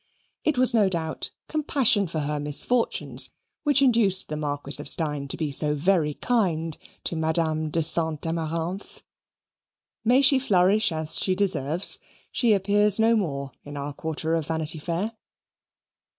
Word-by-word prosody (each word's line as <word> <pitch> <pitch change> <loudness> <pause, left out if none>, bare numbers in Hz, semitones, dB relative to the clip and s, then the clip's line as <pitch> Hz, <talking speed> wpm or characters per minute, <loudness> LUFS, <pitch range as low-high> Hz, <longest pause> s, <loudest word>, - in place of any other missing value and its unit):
It 305 -4 0
was 255 0 +5
no 210 -4 +3
doubt 160 -3 -3 0.2
compassion 270 - +1
for 160 -1 -4
her 150 0 -3
misfortunes 150 - +1 0.3
which 285 -2 +3
induced 225 -7 +2
the 150 - -4
Marquis 145 -1 +1
of 145 - -5
Steyne 150 -3 +1
to - - -2
be 155 -3 -3
so 150 +2 +3
very 155 -1 +1
kind 165 -10 -1 0.3
to - - -2
Madame 160 -1 -1
de 165 +1 0
Saint 160 -1 +2
Amaranthe. 165 +3 -4 1.0
May 250 +4 +3
she 275 -1 +6
flourish 200 -3 +2
as 155 -1 0
she 185 - +1
deserves 170 -3 +1 0.3
she 235 -4 +2
appears 205 +1 +2
no 225 +1 +4
more 140 -9 -3
in 145 0 -9
our 140 +1 -5
quarter 160 +2 -3
of 165 -3 -1
Vanity 160 -1 -2
Fair. 175 +7 -3
165 Hz, 150 wpm, -24 LUFS, 150-205 Hz, 1.0 s, she